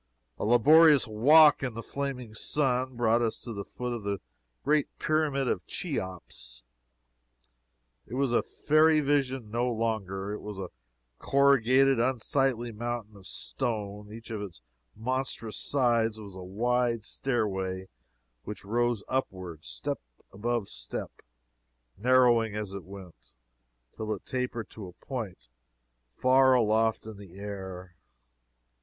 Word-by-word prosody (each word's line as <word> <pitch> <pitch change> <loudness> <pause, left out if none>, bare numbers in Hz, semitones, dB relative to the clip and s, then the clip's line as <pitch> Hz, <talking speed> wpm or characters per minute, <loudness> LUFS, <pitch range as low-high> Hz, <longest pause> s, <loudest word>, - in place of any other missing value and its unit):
A - - -1
laborious 145 +5 +6
walk 145 +8 +6
in 125 -5 -3
the 115 - -5
flaming 135 -5 -4
sun 130 +1 0
brought 115 0 +3
us 115 -2 -1
to 120 - -6
the 100 -1 -5
foot 125 +4 -5
of 120 - -4
the 100 -1 -2 0.4
great 150 0 +2
Pyramid 150 -4 +1
of - - -1
Cheops. 90 - -5 1.4
It 120 - -6
was 135 -2 +1
a - - +4
fairy 155 +1 +3
vision 135 -6 0
no 120 +2 0
longer. 105 -4 -2
It 105 - -5
was 105 -1 -7
a 95 -2 -6 0.5
corrugated, 135 -1 +4
unsightly 125 0 +1
mountain 115 -1 -5
of 100 -2 -13
stone. 105 -2 -3
Each 115 +1 -9
of 110 -2 -3
its 90 -12 -8 0.3
monstrous 125 -2 -3
sides 115 -5 +1
was 100 -3 -10
a 95 - -8
wide 115 +4 0
stairway 95 -8 -2 0.6
which 105 -2 -7
rose 120 0 0
upward, 95 - -3
step - - -4 0.3
above 115 +1 -2
step, - - -6 0.8
narrowing 120 -1 +4
as 105 -2 -4
it 100 -2 -7
went, 90 -10 -13 0.6
till 110 -1 -4
it 95 - -14
tapered 125 -3 -3
to 105 -4 -8
a 90 - -11
point 100 - -6 0.6
far 130 - +4
aloft 110 -1 +2
in 110 -2 -8
the 95 -3 -13
air. 95 -3 -7
115 Hz, 130 wpm, -29 LUFS, 100-130 Hz, 1.4 s, laborious